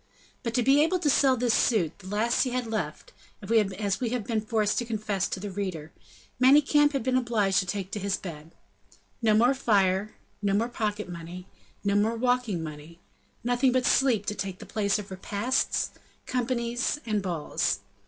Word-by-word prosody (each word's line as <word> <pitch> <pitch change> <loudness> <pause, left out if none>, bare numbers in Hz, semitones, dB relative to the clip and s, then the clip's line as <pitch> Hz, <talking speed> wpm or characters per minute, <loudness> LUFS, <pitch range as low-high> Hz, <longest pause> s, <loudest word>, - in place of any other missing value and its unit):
But 230 -2 -3
to 245 - +2
be 275 +4 +5
able 345 +4 +1
to 315 -5 +2
sell 265 -2 +4
this 240 -1 +1
suit, 185 -12 +1
the 190 - -12
last 215 +4 +1
he 260 - +1
had 250 0 -2
left, 220 -1 -4 0.3
as 205 -3 +1
we 245 -3 -1
have 245 -1 -2
been 220 0 -1
forced 215 -1 0
to 240 - -3
confess 215 -4 -2
to - - -4
the 200 +1 -5
reader 180 -6 -4 0.5
Manicamp 290 +2 +5
had 275 - -1
been 255 +1 +1
obliged 220 -6 +2
to 185 - -2
take 195 0 -4
to 210 - -3
his 200 0 -1
bed. 160 -3 -9 0.7
No 215 -2 +4
more 240 +5 +5
fire, 205 -5 +1 0.3
no 200 -1 +1
more 230 +4 +1
pocket 210 -3 -3
money, 175 +1 -8 0.4
no 200 -1 +1
more 210 +3 +2
walking 245 -7 0
money, 155 +2 -9 0.4
nothing 245 +2 +2
but 255 0 +1
sleep 245 -6 +3
to - - -1
take 190 -2 -5
the - - -10
place 205 -2 0
of 205 -2 -8
repasts, 205 +6 -1 0.3
companies 245 +2 -1
and 215 -3 0
balls. 175 -5 -1
215 Hz, 185 wpm, -27 LUFS, 195-245 Hz, 0.7 s, be